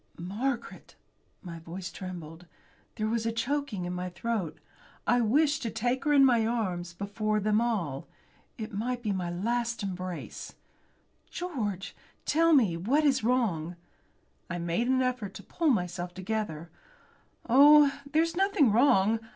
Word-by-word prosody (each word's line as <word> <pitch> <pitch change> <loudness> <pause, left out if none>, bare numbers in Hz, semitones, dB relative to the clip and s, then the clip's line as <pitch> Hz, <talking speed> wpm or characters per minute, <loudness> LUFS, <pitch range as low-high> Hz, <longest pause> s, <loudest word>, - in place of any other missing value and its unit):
"Margaret!" 230 +8 -4 0.5
My 170 -2 -7
voice 175 +3 -7
trembled. 175 -2 -8 0.5
There 215 - -1
was 225 0 -1
a - - +1
choking 240 -4 -2
in 180 - -3
my 180 0 -3
throat. 185 -1 -3 0.5
I 245 - +3
wished 285 +5 +2
to 230 - -2
take 245 +5 -1
her 300 - +2
in 280 -2 +7
my 240 -4 +4
arms 185 -7 -2
before 215 +2 -1
them 210 +2 +2
all. 175 - -2 0.5
It 220 -1 -6
might 240 +4 -2
be 210 - 0
a - - +1
last 215 +6 -2
embrace. 185 -2 -6 0.7
"George, 220 - -4 0.3
tell 330 +2 +3
me, 230 - +4
what 245 - +1
is 270 -5 +2
wrong?" 200 -9 0 0.7
I 175 - -3
made 170 +7 -1
an 260 0 +2
effort 245 -6 -2
to - - -9
pull 330 -2 0
myself 180 -5 -1
together. 185 -5 -4 0.8
"Oh! 285 +3 +7 0.2
there's 325 +2 +2
nothing 385 - +3
wrong. 220 -2 +4
220 Hz, 145 wpm, -29 LUFS, 180-255 Hz, 0.8 s, in